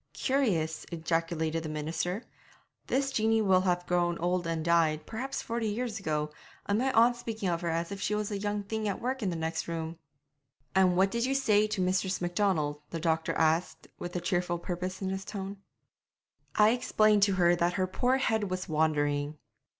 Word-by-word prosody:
'Curious,' 195 - 0
ejaculated 165 -1 -1
the 160 - -5
minister. 160 +7 -2 0.6
'This 275 +1 +1
Jeanie 225 -2 +2
will 190 -2 +4
have 175 -1 0
grown 175 -1 +1
old 175 0 0
and 165 -1 -2
died, 160 -2 +2
perhaps, 255 +5 -4
forty 230 -1 -2
years 220 +1 -2
ago, 150 -4 -1 0.3
and 205 +2 +1
my 265 +2 +1
aunt's 240 +1 +5
speaking 220 -5 -3
of 170 -1 -1
her 170 - -1
as 165 +2 -1
if 200 0 -5
she 210 - 0
was 210 0 -2
a 205 - -1
young 205 0 -2
thing 215 +1 -3
at 200 - -2
work 260 +2 -2
in 200 - 0
the 175 - -2
next 165 0 -2
room!' 165 0 -4 0.7
'And 185 -2 +4
what 195 +1 +4
did 235 +2 0
you 270 +1 0
say 215 -6 +3
to 210 -2 -2
Mistress 185 +1 +1
Macdonald?' 175 -5 0
the 165 - -4
doctor 160 0 0
asked, 160 +2 +1
with 175 0 -6
a - - +1
cheerful 175 0 0
purpose 185 +2 -4
in 190 - -1
his 190 0 -3
tone. 200 0 -6 1.0
'I 210 0 +6
explained 215 -3 +3
to 200 0 +4
her 175 -1 +4
that 175 0 +1
her 185 0 +1
poor 250 +7 +1
head 220 -6 0
was 185 +1 -3
wandering.' 150 -2 0
185 Hz, 190 wpm, -30 LUFS, 165-210 Hz, 1.0 s, I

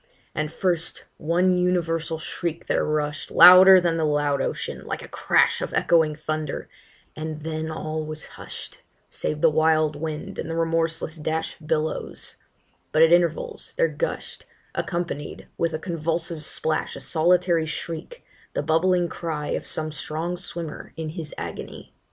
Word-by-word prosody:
And 155 0 -2
first 170 -1 -1
one 180 +4 +2
universal 165 -3 0
shriek 165 +1 -3
there - - +1
rush'd, 150 -1 -1
Louder 185 +1 +10
than 170 -2 +1
the 160 - 0
loud 145 -2 +1
ocean, - - -3
like - - -5
a - - -9
crash - - +2
Of - - -3
echoing 160 -3 +3
thunder; 155 0 -4 0.5
and 155 -1 -5
then 160 0 -3
all 155 0 -3
was 155 0 -5
hush'd, - - -7 0.3
Save 150 0 -2
the - - +6
wild 155 -1 +3
wind 155 0 -5
and 160 - -4
the 165 - -2
remorseless 165 -1 0
dash 160 +1 -2
Of 155 - -13
billows; 155 +1 -2 0.5
but 155 - +5
at 165 +1 +6
intervals 175 -2 +1
there - - +3
gush'd, - - -3 0.3
Accompanied 170 -4 -4
with 165 -1 0
a 155 - -2
convulsive 165 -1 -2
splash, 155 0 -2
A - - -7
solitary 170 0 +2
shriek, 165 - -6 0.3
the - - -1
bubbling 175 +2 +2
cry 160 -3 -4
Of - - -2
some 155 0 -2
strong 160 +3 -3
swimmer 170 -3 -6
in 160 -1 -3
his 160 -2 -6
agony. - - -7
160 Hz, 150 wpm, -24 LUFS, 155-170 Hz, 0.5 s, Louder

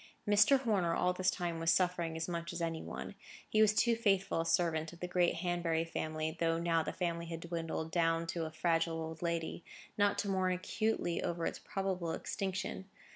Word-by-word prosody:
Mr. 210 +6 +6
Horner 195 -9 +1
all 180 0 +2
this 185 0 +1
time 170 -3 -2
was 165 0 +3
suffering 175 -3 +1
as 160 - -2
much 170 0 -3
as 170 - -4
any 165 -1 -2
one. - - -6 0.3
He 215 - +3
was 215 -1 +6
too 230 +3 +4
faithful 195 -6 +2
a - - -3
servant 160 -3 +1
of 170 - -13
the 180 - -3
great 175 -1 +2
Hanbury 170 -1 0
family, 155 -1 -3
though 165 -1 +2
now 165 -1 +2
the - - -3
family 170 -2 -2
had 165 -1 -5
dwindled 165 -1 -3
down 165 -1 +2
to 165 -2 -2
a 160 - -5
fragile 165 0 +1
old 160 0 -6
lady, 170 -1 -2 0.4
not 205 0 +3
to - - -1
mourn 185 -1 +1
acutely 185 -1 -1
over 170 -1 -2
its - - -2
probable 185 -4 -2
extinction. 190 0 -3
170 Hz, 195 wpm, -34 LUFS, 165-185 Hz, 0.4 s, Mr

